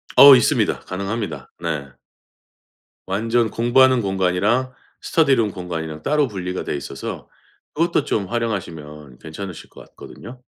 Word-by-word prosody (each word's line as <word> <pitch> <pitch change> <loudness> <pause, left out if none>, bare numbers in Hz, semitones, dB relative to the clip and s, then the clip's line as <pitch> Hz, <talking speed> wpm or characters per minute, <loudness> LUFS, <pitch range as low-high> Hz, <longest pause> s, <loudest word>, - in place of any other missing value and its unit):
어 140 -1 +10
있습니다. 125 - +2
가능합니다. 100 +4 -5
네. 80 -5 -3 1.2
완전 115 +4 0
공부하는 125 +2 +3
공간이랑 100 +6 0 0.3
스터디룸 135 -10 +2
공간이랑 80 -4 -6
따로 150 0 +2
분리가 90 -4 -5
돼 - - -3
있어서 70 - -7 0.5
그것도 165 -1 +1
좀 100 - -1
활용하시면 80 - -5
괜찮으실 80 +5 -8
것 - - -14
같거든요. 125 +3 -12
100 Hz, 320 characters per minute, -21 LUFS, 90-120 Hz, 1.2 s, 어